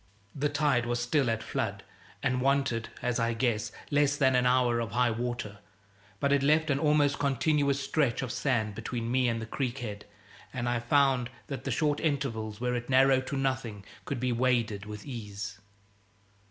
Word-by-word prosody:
The 145 +1 0
tide 140 -5 +1
was 120 0 0
still 120 +2 +1
at 115 0 -1
flood, - - -3 0.4
and 130 -1 +1
wanted 135 -4 +1
(as 125 0 0
I 115 0 +1
guessed) 115 -3 0 0.2
less 145 0 +3
than 130 -2 +3
an 125 0 +3
hour 125 -2 +3
of 115 -3 -3
high 125 0 +3
water; 115 -3 -4 0.6
but 140 -1 +2
it 140 - +3
left 155 +2 +3
an 140 - +1
almost 150 -2 +3
continuous 140 0 +1
stretch 140 -4 0
of 125 - -3
sand 120 -5 0
between 115 +3 -4
me 130 0 +3
and 115 -1 -1
the 115 - -5
creek 125 +2 -3
head, 105 -5 -6 0.5
and 120 -2 -3
I 120 0 +1
found 130 0 +2 0.2
that 135 -2 -6
the - - -1
short 145 +4 +1
intervals 110 -8 -2
where 125 0 -1
it 120 +1 -3
narrowed 130 0 +4
to 140 - -2
nothing 130 -7 -2 0.2
could 140 - -3
be 125 +1 0
waded 115 -4 0
with 105 -1 -8
ease. 105 -5 -6
125 Hz, 180 wpm, -29 LUFS, 115-140 Hz, 0.6 s, narrowed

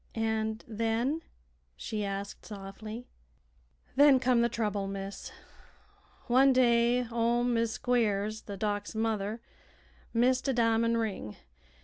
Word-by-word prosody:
"And 220 0 -1
then?" 230 +7 -1 0.5
she 215 -3 -4
asked, 200 0 -5
softly. 215 +3 -8 0.9
"Then 280 -1 +7
come 250 -2 +3
the 235 - +2
trouble, 210 -4 -2
miss. 195 0 -6 0.9
One 265 +2 +5
day 240 -1 +3
ol' 235 +1 +1
Mis' 230 -2 +1
Squiers, 215 -3 0
the 200 -2 -6
Doc's 205 +1 -2
mother, 220 0 -1 0.7
missed 250 +3 +2
a 270 - +2
di'mon' 230 -1 +2
ring. 200 - -3
225 Hz, 110 wpm, -30 LUFS, 210-240 Hz, 0.9 s, Then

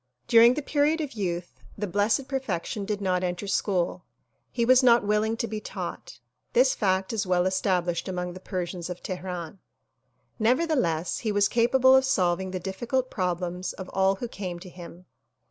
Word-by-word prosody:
During 235 +2 +7
the 300 - -3
period 300 +3 +1
of 295 -4 -4
youth 175 -5 -4 0.2
the 210 - -2
Blessed 205 +8 +1
Perfection 215 -7 -3
did 205 0 -3
not 185 -2 0
enter 180 +2 -2
school. 195 -3 -1 0.5
He 235 -2 0
was 255 +2 +6
not 240 -3 +5
willing 215 +2 +1
to 230 - -2
be 215 -1 -4
taught. - - -7 0.4
This - - +4
fact 190 0 0
is 215 -3 -1
well 180 -1 +2
established 180 -2 0
among 180 -1 -3
the 185 - -9
Persians 180 -2 -4
of 180 0 -7
Teheran. 180 -1 -5 0.8
Never 250 +9 +3
theless 175 - 0
he 220 - -2
was 205 -1 +3
capable 260 +3 +4
of 265 - +5
solving 185 -6 +1
the 185 0 -4
difficult 240 +8 -2
problems 180 0 -2
of 190 -1 -8
all 190 0 +2
who 240 +5 -5
came 185 -5 -6
to 185 - -10
him. 175 0 -12
195 Hz, 175 wpm, -26 LUFS, 180-235 Hz, 0.8 s, During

